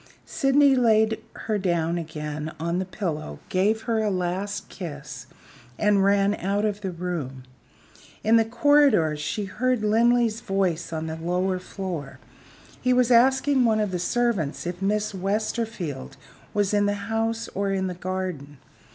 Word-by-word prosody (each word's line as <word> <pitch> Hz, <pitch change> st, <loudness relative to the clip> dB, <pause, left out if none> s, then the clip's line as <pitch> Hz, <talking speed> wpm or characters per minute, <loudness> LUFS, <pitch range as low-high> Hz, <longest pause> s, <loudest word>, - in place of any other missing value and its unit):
Sydney 275 Hz, 0 st, +4 dB
laid 220 Hz, -3 st, +3 dB, 0.2 s
her 215 Hz, -2 st, 0 dB
down 170 Hz, -2 st, 0 dB
again 155 Hz, -1 st, -5 dB
on 170 Hz, +2 st, -1 dB
the 190 Hz, -, -2 dB
pillow, 160 Hz, -, -4 dB
gave 210 Hz, +4 st, +1 dB
her 225 Hz, -1 st, 0 dB
a 215 Hz, -, +1 dB
last 190 Hz, +2 st, -2 dB
kiss, 140 Hz, -7 st, -8 dB, 0.5 s
and 205 Hz, -2 st, +3 dB
ran 200 Hz, 0 st, +3 dB
out 200 Hz, +1 st, -1 dB
of 210 Hz, -1 st, -2 dB
the 195 Hz, -, -3 dB
room. 165 Hz, -7 st, -4 dB, 0.8 s
In 220 Hz, +2 st, +4 dB
the 225 Hz, -, +6 dB
corridor 240 Hz, -, +4 dB
she 150 Hz, +8 st, -3 dB
heard 250 Hz, +3 st, 0 dB
Linley's 230 Hz, +1 st, +3 dB
voice 185 Hz, -4 st, -1 dB
on 160 Hz, -1 st, -3 dB
the 160 Hz, 0 st, -4 dB
lower 180 Hz, +3 st, -1 dB
floor. 180 Hz, -6 st, -6 dB, 0.6 s
He 255 Hz, 0 st, +3 dB
was 250 Hz, -1 st, +3 dB
asking 265 Hz, +2 st, +4 dB
one 220 Hz, -2 st, +3 dB
of 210 Hz, -2 st, 0 dB
the 180 Hz, -, -2 dB
servants 195 Hz, -7 st, 0 dB
if 175 Hz, +1 st, -4 dB
Miss 210 Hz, +2 st, 0 dB
Westerfield 195 Hz, -, -3 dB, 0.3 s
was 205 Hz, -1 st, 0 dB
in 205 Hz, 0 st, +3 dB
the 205 Hz, -, +1 dB
house 225 Hz, +1 st, -1 dB
or 200 Hz, 0 st, -1 dB
in 190 Hz, -1 st, 0 dB
the 185 Hz, -, -2 dB
garden. 180 Hz, -6 st, -5 dB
195 Hz, 150 wpm, -25 LUFS, 175-225 Hz, 0.8 s, the